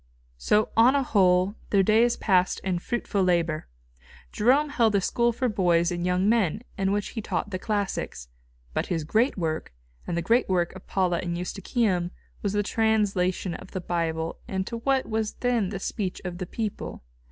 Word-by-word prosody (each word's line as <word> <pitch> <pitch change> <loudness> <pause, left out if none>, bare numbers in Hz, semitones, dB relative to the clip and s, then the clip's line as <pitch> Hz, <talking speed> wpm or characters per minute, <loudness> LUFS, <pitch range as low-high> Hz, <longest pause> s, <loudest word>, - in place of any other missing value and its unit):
So 210 - +2
on 240 +4 +6
a 280 - +2
whole 185 -4 +3 0.2
their 195 -2 +4
days 225 +4 +3
passed 185 -3 +2
in 185 -2 -1
fruitful 210 -1 -2
labour. 170 -3 +1 0.6
Jerome 270 +7 +3
held 230 -7 +2
a - - +5
school 235 +5 +2
for 255 +2 -1
boys 175 -5 +2
and 175 0 -3
young 180 +2 +2
men, 220 -2 +2
in 195 -2 0
which 205 0 -1
he 225 - -5
taught 205 0 -3
the 185 - -3
classics. 200 - -3 0.5
But - - -1
his 165 -3 -1
great 220 - +1
work, 160 -3 -2 0.4
and 170 - -2
the 170 - -1
great 235 +5 +2
work 180 -1 +1
of 190 - -12
Paula 180 -3 +1
and 170 -1 -3
Eustochium, 185 0 -1 0.3
was 200 -1 -1
the 205 0 +1
translation 200 -5 +1
of - - -10
the 185 - -2
Bible 165 -2 -2
into 190 +4 -3
what 265 +3 +1
was 220 -1 -1
then 240 -6 0
the 195 - -4
speech 190 0 -3
of 180 -1 -5
the 185 - -4
people. 215 - -5
195 Hz, 180 wpm, -26 LUFS, 180-220 Hz, 0.6 s, on